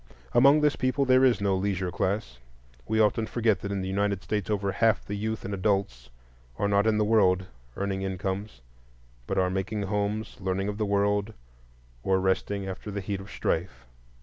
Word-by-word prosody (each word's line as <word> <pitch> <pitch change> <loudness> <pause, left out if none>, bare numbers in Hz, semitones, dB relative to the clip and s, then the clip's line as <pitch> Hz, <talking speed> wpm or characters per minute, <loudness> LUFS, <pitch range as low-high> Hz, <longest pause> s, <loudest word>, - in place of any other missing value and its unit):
Among 140 +5 +6
this 150 -1 +3
people 130 +2 0
there 130 0 +5
is 125 -4 +4
no 100 -1 +2
leisure 95 -1 -1
class. 95 - -2 0.5
We 110 - +1
often 110 +1 +2
forget 110 -5 +1
that 100 - -5
in 100 -1 -2
the 95 - -3
United 100 0 -1
States 105 -1 -2
over 100 -2 0
half 115 +2 +2
the 100 - -5
youth 110 +1 -3
and 100 - -4
adults 95 - -1 0.5
are 100 - +1
not 100 +1 +2
in 110 -1 +3
the 105 - +2
world 95 -4 +3 0.3
earning 100 -1 -2
incomes, 95 - -4 0.7
but - - -2
are 90 -1 +2
making 100 +2 -2
homes, 105 +2 -2
learning 95 +1 -1
of 105 +1 -5
the 105 - 0
world, 100 +1 +1 0.7
or 95 +7 +2
resting 95 +1 -1
after 95 +2 -6
the 100 0 -3
heat 100 0 -3
of 95 - -10
the - - -13
strife. 80 -6 -2
100 Hz, 190 wpm, -27 LUFS, 95-110 Hz, 0.7 s, Among